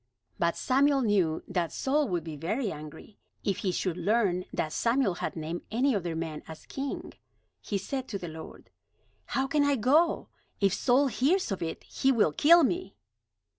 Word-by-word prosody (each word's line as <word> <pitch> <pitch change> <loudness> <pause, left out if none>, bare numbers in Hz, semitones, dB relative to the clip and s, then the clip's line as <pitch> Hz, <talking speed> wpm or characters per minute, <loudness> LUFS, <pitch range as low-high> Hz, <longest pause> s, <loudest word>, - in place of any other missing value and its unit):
But 170 0 +1
Samuel 275 +1 +3
knew 190 -9 +1
that 175 -3 -1
Saul 290 +2 +1
would 175 -5 -1
be 160 -2 -6
very 200 - -2
angry, 155 +7 -10 0.2
if 195 -3 0
he 190 - -1
should 180 -1 -2
learn 185 -1 +1
that 155 - -2
Samuel 235 -4 +2
had - - -3
named 165 +2 -4
any 250 +3 +2
other 175 -4 -2
man 160 -2 -4
as 160 -1 -10
king. 275 0 -5 0.5
He 205 - -2
said 260 +7 -4
to 205 - -3
the 180 - -7
Lord: 160 0 -10 0.7
"How 265 - +2
can 295 +1 +2
I 285 0 +3
go? 295 +8 +2 0.3
If 195 -2 +3
Saul 250 +7 +3
hears 280 - +1
of 195 - -3
it, 165 -1 -4
he 270 - +1
will 225 - +3
kill 335 - +6
me." 350 +7 -1
205 Hz, 175 wpm, -29 LUFS, 170-270 Hz, 0.7 s, kill